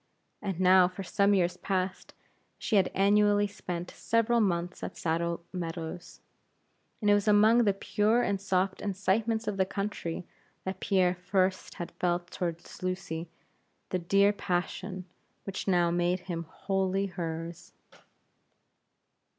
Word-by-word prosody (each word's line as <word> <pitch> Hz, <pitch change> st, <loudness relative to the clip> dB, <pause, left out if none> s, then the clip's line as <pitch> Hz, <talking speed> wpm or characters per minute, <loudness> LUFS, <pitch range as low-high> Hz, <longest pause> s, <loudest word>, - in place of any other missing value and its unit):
And 195 Hz, -4 st, -3 dB
now, 185 Hz, 0 st, +6 dB
for 185 Hz, +2 st, -7 dB
some 200 Hz, +2 st, +3 dB
years 180 Hz, -1 st, +1 dB
past, 185 Hz, -1 st, -3 dB, 0.4 s
she 220 Hz, -, -1 dB
had 195 Hz, -2 st, +4 dB
annually 205 Hz, +1 st, +4 dB
spent 180 Hz, -3 st, -5 dB
several 230 Hz, +1 st, +1 dB
months 180 Hz, -4 st, 0 dB
at -, -, -6 dB
Saddle 170 Hz, 0 st, -1 dB
Meadows; 170 Hz, -1 st, -6 dB, 0.8 s
and 210 Hz, -, +2 dB
it -, -, +7 dB
was 205 Hz, +1 st, +2 dB
among 215 Hz, +3 st, +6 dB
the 200 Hz, -, +4 dB
pure 215 Hz, +4 st, +2 dB
and 195 Hz, -1 st, -1 dB
soft 190 Hz, 0 st, 0 dB
incitements 210 Hz, +3 st, 0 dB
of 205 Hz, -2 st, -1 dB
the 190 Hz, -, +3 dB
country 195 Hz, -4 st, -4 dB, 0.4 s
that 190 Hz, 0 st, -4 dB
Pierre 185 Hz, -3 st, +2 dB
first 185 Hz, +1 st, -1 dB
had 175 Hz, -, -6 dB
felt 175 Hz, 0 st, 0 dB
toward 170 Hz, -1 st, -3 dB, 0.2 s
Lucy 180 Hz, -3 st, -3 dB, 0.6 s
the 185 Hz, -, 0 dB
dear 200 Hz, +4 st, +3 dB
passion 185 Hz, 0 st, -3 dB, 0.4 s
which 195 Hz, 0 st, -5 dB
now 175 Hz, -2 st, +3 dB
made 175 Hz, +1 st, +1 dB
him 170 Hz, -3 st, -5 dB
wholly 195 Hz, 0 st, -1 dB
hers. 165 Hz, -2 st, -6 dB
185 Hz, 135 wpm, -29 LUFS, 175-200 Hz, 0.8 s, it